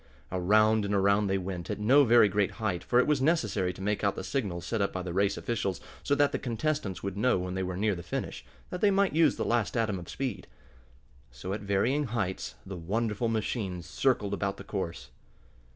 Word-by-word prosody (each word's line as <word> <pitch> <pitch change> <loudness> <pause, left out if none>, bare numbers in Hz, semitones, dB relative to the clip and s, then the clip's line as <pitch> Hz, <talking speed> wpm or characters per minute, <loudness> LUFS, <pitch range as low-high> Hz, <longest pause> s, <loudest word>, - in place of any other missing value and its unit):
Around 110 +4 +3
and 100 0 0
around 100 +1 +3
they 95 0 +1
went, 90 -2 -5
at - - -2
no 130 +7 +5
very 120 -2 +6
great 100 0 0
height, 100 -5 -2
for 120 - +1
it 125 - +5
was 150 -3 +1
necessary 110 - +1
to 95 +2 -9
make 105 +1 -1
out 100 - +2
the - - -5
signals 95 -4 -3
set 115 -3 -1
up 100 - +1
by 95 - -4
the 90 -1 -5
race 100 +2 +1
officials, 100 -6 -2 0.2
so 140 - +1
that 145 0 +3
the - - -2
contestants 120 - -2
would 100 -1 -3
know 125 +3 +2
when 90 0 -3
they 95 - -2
were 90 -1 -3
near 105 +1 +1
the 85 - -6
finish, 85 - -5 0.3
that 180 - -4
they 210 - +5
might 195 -2 +2
use 160 -2 +4
the - - -2
last 115 -1 0
atom 105 -4 0
of 85 - -10
speed. 125 -8 -4 0.8
So 60 +11 -6
at 105 - -4
varying 110 +9 +1
heights 110 -6 -3
the 95 -1 -6
wonderful 105 +6 -1
machines 105 -5 -2
circled 110 -7 0
about 100 0 -2
the - - -9
course. 85 -10 -5
100 Hz, 215 wpm, -29 LUFS, 95-120 Hz, 0.8 s, very